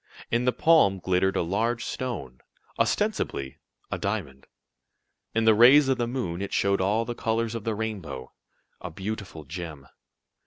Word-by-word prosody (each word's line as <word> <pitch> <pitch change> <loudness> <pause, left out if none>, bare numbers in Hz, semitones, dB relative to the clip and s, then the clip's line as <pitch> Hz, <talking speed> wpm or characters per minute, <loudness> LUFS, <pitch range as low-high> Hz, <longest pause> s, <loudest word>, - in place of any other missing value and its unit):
In 120 +1 +1
the 125 - +4
palm 155 -11 +4
glittered 95 +1 +1
a - - +1
large 115 +7 -1
stone 90 - -5 0.4
ostensibly 65 -1 -1 0.3
a - - -2
diamond. 65 0 -4 0.9
In 115 0 +2
the 110 - +7
rays 130 +6 +7
of 130 -1 +1
the 120 - 0
moon 95 -9 -3
it 100 - -4
showed 100 -1 +2
all 105 +4 +1
the 120 - -3
colors 115 0 -1
of 115 -3 -5
the 110 -2 -1
rainbow 95 -12 -5 0.5
a 90 - -5
beautiful 95 -2 -6
gem. 80 -2 -7
105 Hz, 155 wpm, -26 LUFS, 85-115 Hz, 0.9 s, the